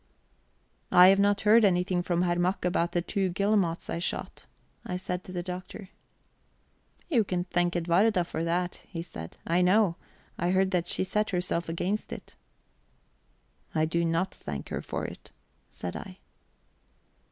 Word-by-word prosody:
"I 180 +1 +9
have 195 +1 +5
not 200 0 +3
heard 220 +2 +6
anything 180 -2 +2
from 175 0 0
Herr 175 -1 +1
Mack 180 +1 0
about 175 -1 +1
the 175 - +1
two 195 0 -1
guillemots 190 -2 +1
I - - -3
shot," 175 - -4 0.4
I 180 - -3
said 180 -1 -4
to - - -9
the 175 -1 -3
Doctor. 185 +2 -7 1.2
"You 245 -9 +3
can 180 -3 -2
thank 175 -1 0
Edwarda 180 +3 +3
for 165 -1 -3
that," 175 +1 -1
he 165 -3 -5
said. 80 - -9
"I 170 +2 +2
know. 185 -1 +3 0.4
I 175 - +1
heard 190 +1 +2
that 175 -2 0
she - - +2
set 210 +3 0
herself 175 -2 -1
against 185 +6 -2
it." - - -9 1.4
"I 155 0 +3
do 170 +1 0
not 165 +3 0
thank 70 -1 -7
her - - -3
for - - -4
it," - - -9 0.4
said 90 - -6
I... 190 -2 -8
180 Hz, 160 wpm, -28 LUFS, 170-190 Hz, 1.4 s, I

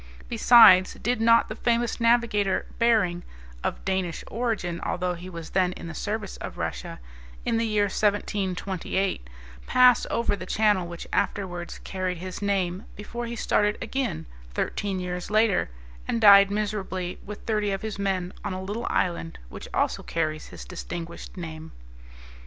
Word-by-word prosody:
Besides, 225 -5 +7
did 240 0 -1
not 230 0 +5
the 215 - -6
famous 235 0 0
navigator, 230 -4 +2
Behring 215 -7 +3 0.4
(of - - -3
Danish 190 -3 -1
origin, 215 -8 -2
although 180 0 -1
he 175 +2 -8
was 165 -3 -8
then 185 -1 +2
in - - -9
the 170 - -6
service 210 +2 -4
of - - -7
Russia), - - -4 0.5
in 230 - +1
the 230 0 +1
year 210 -1 +2
1728 195 - -1 0.4
pass 250 -1 +5
over 235 -2 0
the - - -8
channel 205 -5 +2
which 170 0 -7
afterwards 175 -4 -2
carried 185 -1 -3
his 185 +3 -7
name 195 -1 -1
before 235 +3 -6
he 235 - -5
started 210 -2 +1
again, 260 - -3 0.3
thirteen 195 -2 -2
years 180 0 -4
later, 215 - +3 0.4
and 230 - 0
died 200 -2 +8
miserably 200 -3 -3
with 210 0 -8
thirty 210 -2 0
of 195 +1 -3
his 215 -2 -4
men 190 -2 -1
on - - -3
a 185 0 -5
little 210 +5 -4
island, 170 -2 -1
which - - -9
also - - 0
carries 155 -2 -2
his - - -10
distinguished 170 0 -7
name. 160 -2 -7
195 Hz, 150 wpm, -26 LUFS, 180-220 Hz, 0.5 s, died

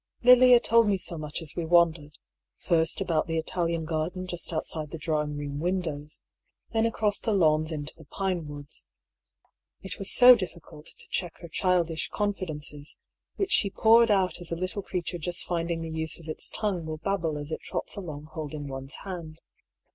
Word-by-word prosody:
Lilia 250 0 +8
told 230 -1 +4
me 200 -1 +2
so 175 -1 -3
much 155 +1 -5
as 155 - -4
we 170 - -2
wandered, 160 -3 +2 0.4
first 165 0 0
about 165 -4 0
the 165 -1 -1
Italian 165 0 -1
garden 165 +4 -3
just 175 -1 -3
outside 155 -1 -2
the 165 - -6
dining 150 -2 -2
room 145 -1 -5
windows, 160 -4 -3 0.5
then 225 0 +2
across 210 -2 0
the 225 - -1
lawns 155 -5 +2
into 150 -1 -4
the 160 - -16
pinewoods. 150 -5 -5 1.0
It 190 - -6
was 195 - +2
so 250 0 +9
diflScult 170 -6 -6
to - - -12
check 175 -3 -2
her 170 - -8
childish 170 -1 0
confidences, 155 -8 -3 0.4
which 390 -1 -2
she 200 - +6
poured 230 +3 +5
out 190 -3 +1
as 170 - -7
a - - 0
little 185 +3 -3
creature 175 -2 -4
just 175 +2 -3
finding 170 -1 -2
the 165 0 -5
use 160 +1 -3
of 165 - -14
its 155 - -4
tongue 195 -6 -2
will 155 0 -5
babble 165 -2 -2
as 145 +1 -7
it - - -4
trots - - -4
along 155 -8 -7
holding 150 -2 -6
one's 135 +1 -5
hand. 170 -5 -7
170 Hz, 180 wpm, -27 LUFS, 155-190 Hz, 1.0 s, so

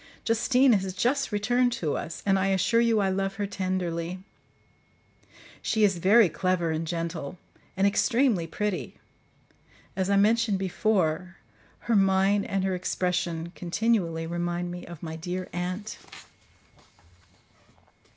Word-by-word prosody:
Justine 245 +3 +3
has 190 -2 0
just 250 +8 0
returned 245 +4 +2
to 165 -11 -2
us; 165 - -6
and 195 -1 +3
I 190 - +1
assure 195 +5 +2
you 230 -2 +3
I 195 - +1
love 195 +1 -1
her 205 - -2
tenderly. 185 -3 -3 1.4
She 220 -2 +1
is 195 -4 +3
very 205 +4 +6
clever 180 -1 0
and 160 +1 -2
gentle, 165 -2 -4 0.4
and 195 - +3
extremely 225 -3 +2
pretty; 210 +1 -3 1.0
as 190 0 -1
I 200 - +3
mentioned 215 0 +3
before, 185 -2 0 0.4
her 235 - 0
mien 195 +1 +3
and 195 -2 -1
her 190 0 0
expression 175 -2 -2
continually 175 -3 0
remind 175 +1 -3
me 175 0 -8
of 170 -2 -10
my 160 -1 -5
dear 180 +3 -4
aunt. 185 +4 -4
190 Hz, 130 wpm, -27 LUFS, 175-210 Hz, 1.4 s, very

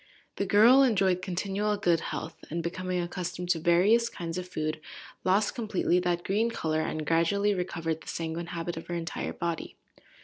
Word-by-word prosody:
The 200 - -1
girl 230 +7 +7
enjoyed 195 -8 +3
continual 200 +3 -1
good 175 -4 +2
health, 160 0 -5
and, 170 +2 -3
becoming 185 +1 -2
accustomed 175 0 -4
to 175 -2 +2
various 195 +8 +4
kinds 170 -2 -5
of 180 - -6
food, 155 -3 -3 0.4
lost 195 +3 +2
completely 210 -6 +1
that 175 -1 0
green 215 +4 +1
colour, 155 -8 -1
and 155 -1 -3
gradually 200 +6 +2
recovered 165 -3 -3
the - - -15
sanguine 165 +1 -4
habit 170 -1 -4
of 165 - -7
her 175 - -3
entire 170 0 -3
body. 170 -1 -4
175 Hz, 170 wpm, -28 LUFS, 165-200 Hz, 0.4 s, girl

